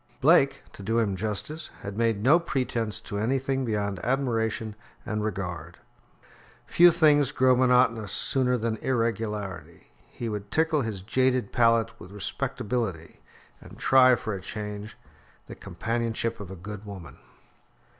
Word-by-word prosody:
Blake, - - +4
to - - -11
do 115 +4 -1
him 105 -4 +1
justice, 110 - -3
had 100 0 -6
made 115 -2 0
no 150 +7 +6
pretence 125 -9 -2
to 100 - -5
anything 135 +4 0
beyond 100 -4 -2
admiration 115 -3 -1 0.3
and 105 -1 -2
regard. 95 -4 -4 0.9
Few 175 +1 +6
things 150 -5 +4
grow 130 0 +4
monotonous 125 -4 +3
sooner 125 -2 +1
than 115 -1 -2
irregularity. 110 -5 -3 0.2
He 120 - -6
would 105 -2 -5
tickle 160 +1 +2
his 105 -6 -4
jaded 130 +1 +1
palate 115 -1 +2
with 90 - -11
respectability, 100 -3 -3 0.4
and - - -13
try 130 -1 +6
for 110 -2 -4
a 95 - -5
change 105 +2 -6 0.5
the - - -9
companionship 115 0 -3
of 100 -3 -8
a 95 - -7
good 105 +3 -8
woman. 95 - -10
115 Hz, 135 wpm, -26 LUFS, 105-125 Hz, 0.9 s, no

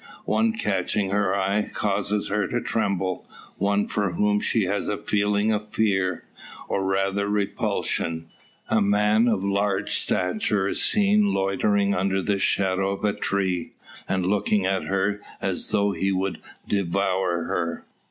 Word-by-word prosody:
One 225 0 +2
catching 100 - -1
her 100 -1 +1
eye, 100 +2 +1
causes 105 0 -1
her 105 +1 0
to 120 - -1
tremble; 95 -6 -1 0.3
one 100 +1 +1
for 100 -4 -1
whom 105 +3 +2
she 110 +1 +1
has 100 +2 -1
a 105 - -1
feeling 105 +1 +1
of 105 0 -2
fear, 95 -5 0 0.4
or 95 - -1
rather 95 +1 0
repulsion. 90 -5 -1 0.4
A 110 - +2
man 105 +3 +3
of 105 -5 +1
large 100 0 0
stature 95 +1 0
is - - 0
seen 205 -1 +3
loitering 100 +1 +1
under 95 +1 +1
the 100 -1 0
shadow 95 0 +1
of - - -12
a 105 - +2
tree, 95 -3 -1 0.4
and 95 -1 0
looking 100 0 +1
at 95 0 0
her 100 +1 0 0.2
as - - -2
though 100 0 +2
he 95 0 -1
would 95 0 -1 0.3
devour 95 -2 0
her. 85 0 -3
100 Hz, 145 wpm, -24 LUFS, 95-105 Hz, 0.4 s, man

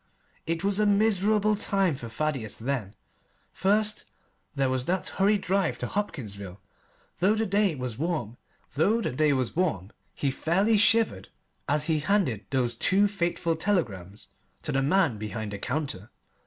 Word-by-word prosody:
It 165 +1 -2
was 200 0 +1
a 210 - +3
miserable 210 0 +3
time 195 -5 +1
for 120 -3 -8
Thaddeus 130 -3 -3
then. 115 -5 -3 0.6
First 210 +2 +1 0.5
there 135 -1 +1
was 130 -1 -1
that 185 +3 -1
hurried 205 +1 +2
drive 190 -11 0
to 125 - -4
Hopkinsville. 105 - -5 0.6
Though 195 +5 +3
the 220 0 0
day 200 -3 +2
was 125 -3 -5
warm 155 -9 -2 1.8
he 140 - 0
fairly 195 +10 +2
shivered 210 - +3 0.4
as 145 +1 +3
he 160 -1 +1
handed 150 - 0
those 125 -3 0
two 195 - +4
fateful 170 -4 -1
telegrams 105 - -2 0.3
to 155 - -2
the 135 -1 +1
man 140 - +2
behind 105 0 -5
the 100 - -5
counter. 125 -5 -3
160 Hz, 135 wpm, -27 LUFS, 120-200 Hz, 1.8 s, two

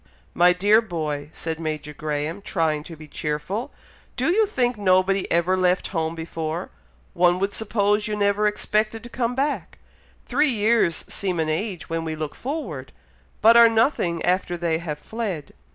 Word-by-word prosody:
"My 175 +1 +5
dear 205 +5 +4
boy!" 155 -8 -4
said 160 -1 -5
Major 155 -2 -4
Graham, 150 +4 -3
trying 160 -6 0
to 165 - -9
be 155 0 -12
cheerful; 150 - -3 0.4
"do 265 +7 +1
you 435 +1 +3
think 250 -10 0
nobody 190 -1 +2
ever 170 +2 +3
left 185 0 +1
home 165 -3 -2
before? 165 0 -4 0.4
One 175 0 +3
would 195 +2 -1
suppose 210 -1 +1
you 210 - -2
never 205 0 +2
expected 215 +1 0
to 240 - -7
come 245 -1 -1
back! 280 +2 -2 0.5
Three 305 - +2
years 220 -6 +2
seem 185 -4 -2
an 160 -1 0
age 180 +3 -3
when 165 0 -2
we 160 -1 -3
look 155 -2 -4
forward, 235 - -5 0.5
but 225 +2 +8
are 235 -1 +9
nothing 220 - +1
after 180 -1 0
they 165 -2 0
have 155 -3 -4
fled. 195 -4 -5
185 Hz, 165 wpm, -23 LUFS, 160-220 Hz, 0.5 s, are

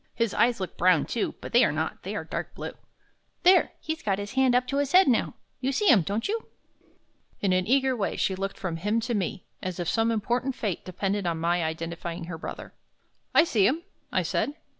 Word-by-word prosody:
His 230 -3 0
eyes 235 -1 +3
look 185 - -5
brown, 180 -3 +4
too; 235 - -2
but - - -8
they - - +7
are - - +3
not, - - -3
they - - -5
are - - -3
dark - - -5
blue. - - -5 0.7
There! 370 +1 +5
he's 315 0 -4
got 195 -2 0
his 205 0 -5
hand 265 -2 +3
up 250 0 +3
to 275 - 0
his 285 +2 0
head 375 -2 +7
now. 245 -4 +2 0.2
You 265 +1 0
see 375 +9 +2
him, 225 -8 +7
don't 205 +8 -2
you?" 445 +2 -3 0.9
In 195 -2 +1
an 185 +1 +1
eager 265 +1 +3
way 205 -4 -2
she 190 - +1
looked 195 +1 -4
from 175 -4 -3
him 210 +7 0
to 240 +2 -2
me, 195 -2 -2 0.2
as 185 -1 -4
if 175 - -2
some 225 +6 +2
important 240 +4 0
fate 200 -6 -3
depended 195 +1 -2
on 165 -1 0
my 170 +1 +1
identifying 165 +2 -4
her 165 -1 -6
brother. - - -7 0.6
"I - - +8
see 215 - +3
him," 320 +6 0 0.3
I - - +1
said. 290 - -1
210 Hz, 220 wpm, -27 LUFS, 185-260 Hz, 0.9 s, I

